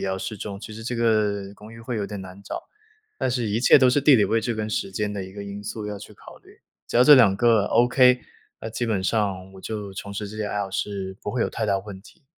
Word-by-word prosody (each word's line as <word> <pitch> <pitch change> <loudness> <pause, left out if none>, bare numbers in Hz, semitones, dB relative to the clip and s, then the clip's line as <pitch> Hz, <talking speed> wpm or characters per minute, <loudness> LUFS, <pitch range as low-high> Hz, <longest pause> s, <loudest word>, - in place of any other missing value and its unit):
要 95 0 -1
适 110 - -5
中。 100 0 -6
其 110 - -9
实 110 - -8
这 125 +1 -3
个 105 -4 +1
公 105 +2 -13
寓 115 - -12
会 115 +1 -4
有 100 - -2
点 105 0 -6
难 95 +1 -11
找， 100 - -6 0.6
但 130 - 0
是 120 -3 -1
一 110 +3 0
切 125 - +7
都 130 -2 +5
是 145 - +2
地 140 -1 +6
理 105 - +4
位 115 +3 +1
置 115 +1 -2
跟 110 -1 -3
时 100 - -2
间 105 +2 -2
的 100 - -4
一 95 - -10
个 100 0 -7
因 100 0 -7
素 105 +1 -5
要 105 -1 -5
去 - - -12
考 - - -14
虑， - - -21 0.3
只 - - -1
要 125 - +6
这 150 - +10
两 110 -8 +5
个 115 -2 +3
Okay， 125 +1 +4 0.4
那 110 - -6
基 120 +2 -2
本 105 -4 0
上 95 -3 -1
我 95 - -12
就 105 -1 -5
从 100 +1 -7
事 105 +1 -4
这 105 - -9
些 105 - -2
爱 105 - -3
好 100 -1 -4
是 95 -1 -4
不 - - -3
会 - - 0
有 - - -1
太 - - -2
大 95 - +1
问 95 -1 -9
题。 150 - -19
105 Hz, 315 characters per minute, -24 LUFS, 100-115 Hz, 0.6 s, 这